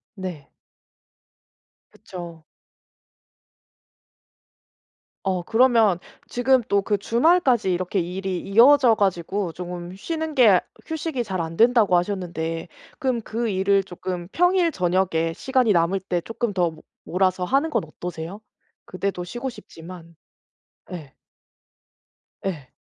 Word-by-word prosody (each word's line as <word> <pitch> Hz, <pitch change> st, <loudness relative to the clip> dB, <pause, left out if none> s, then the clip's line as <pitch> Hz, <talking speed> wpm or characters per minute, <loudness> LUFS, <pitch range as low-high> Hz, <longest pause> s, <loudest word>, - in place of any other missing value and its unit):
네. 180 Hz, -8 st, -7 dB, 1.4 s
그쵸. 170 Hz, -3 st, -10 dB, 2.8 s
어 185 Hz, -2 st, 0 dB
그러면 225 Hz, -4 st, +4 dB, 0.3 s
지금 255 Hz, +1 st, +3 dB
또 200 Hz, 0 st, +3 dB
그 205 Hz, +1 st, 0 dB
"주말까지 240 Hz, -, +3 dB
이렇게 185 Hz, +2 st, -1 dB
일이 185 Hz, +1 st, -3 dB
이어져 240 Hz, +5 st, +5 dB
가지고 195 Hz, -1 st, -1 dB
쪼금 175 Hz, +1 st, -7 dB
쉬는 320 Hz, -, -4 dB
게 220 Hz, -9 st, +6 dB, 0.2 s
휴식이 320 Hz, -5 st, -3 dB
잘 185 Hz, -4 st, -2 dB
안된다."고 205 Hz, +4 st, +3 dB
하셨는데 175 Hz, -3 st, -3 dB, 0.3 s
그럼 255 Hz, -3 st, 0 dB
그 230 Hz, +1 st, -3 dB
일을 195 Hz, 0 st, +2 dB
쪼끔 175 Hz, -1 st, -6 dB
평일 355 Hz, -1 st, +3 dB
저녁에 175 Hz, -, 0 dB
시간이 255 Hz, 0 st, +1 dB
남을 175 Hz, +2 st, +2 dB
때 180 Hz, -2 st, -2 dB
쪼끔 225 Hz, +2 st, -3 dB
더 180 Hz, -2 st, +2 dB
모 160 Hz, 0 st, -15 dB, 0.2 s
몰아서 185 Hz, 0 st, 0 dB
하는 275 Hz, -, +1 dB
건 305 Hz, -, 0 dB
어떠세요? 175 Hz, +4 st, -7 dB, 0.4 s
그때도 185 Hz, -1 st, -3 dB
쉬고 240 Hz, +9 st, -5 dB
싶지만. 170 Hz, -6 st, -12 dB, 0.8 s
예. 155 Hz, -7 st, -8 dB, 1.3 s
예. 160 Hz, -9 st, -4 dB
190 Hz, 225 characters per minute, -23 LUFS, 175-235 Hz, 2.8 s, 게